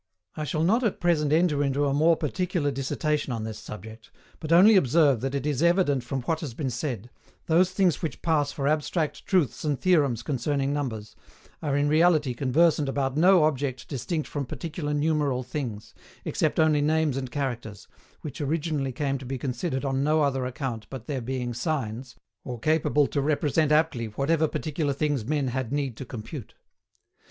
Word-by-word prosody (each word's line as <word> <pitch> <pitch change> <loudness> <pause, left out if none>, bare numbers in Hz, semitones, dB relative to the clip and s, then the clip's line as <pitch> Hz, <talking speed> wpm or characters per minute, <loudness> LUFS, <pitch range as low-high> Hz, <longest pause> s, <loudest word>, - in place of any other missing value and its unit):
I 155 - -3
shall 155 +1 -1
not 225 +9 +3
at 220 - 0
present 155 -4 +1
enter 155 -3 +3
into 140 +1 +1
a 140 - +1
more 160 +4 +4
particular 165 -1 -1
dissertation 145 +2 -1
on 115 -2 -3
this 110 -1 -6
subject, 110 +1 -10 0.3
but 155 -1 -5
only 195 +6 +7
observe 145 - +4
that 135 +1 -2
it 140 - -2
is 145 -2 0
evident 170 -7 +3
from 130 +1 -4
what 160 +4 -1
has 140 -8 -6
been 135 -2 -2
said, 120 -3 -4 0.3
those 175 +3 +3
things 185 -5 +1
which 160 - -4
pass 150 -4 +1
for 140 -1 -2
abstract 155 +1 -1
truths 180 -8 +1
and 145 -3 -1
theorems 145 -11 +2
concerning 140 0 -1
numbers, 115 -7 -4 0.5
are 145 -2 0
in 145 0 +2
reality 155 -3 +3
conversant 145 +3 +2
about 135 -1 -1
no 180 +2 +5
object 135 -4 -1
distinct 155 +3 -3
from 140 -3 -4
particular 155 +1 -4
numeral 145 -3 +1
things, 120 -5 -5 0.3
except - - 0
only 155 -2 +4
names 155 -1 +1
and 130 -2 -3
characters, 120 -6 -4 0.3
which 150 +1 -7
originally 150 -2 -1
came 135 +1 -2
to 130 - -9
be 135 +1 -3
considered 130 +2 -3
on 135 0 0
no 155 +1 +3
other 135 -2 0
account 125 -4 -5
but 130 -4 -8
their 135 -2 -3
being 125 0 -3
signs, 125 -3 -3 0.3
or 125 -2 -5
capable 150 +2 +2
to 140 - -1
represent 150 +1 +1
aptly 150 -7 +2
whatever 155 +8 +1
particular 150 -1 -2
things 145 -3 -1
men 145 -1 0
had 130 -1 -3
need 140 -4 -1
to 130 - -7
compute. 120 +2 -8
145 Hz, 180 wpm, -26 LUFS, 130-155 Hz, 0.5 s, only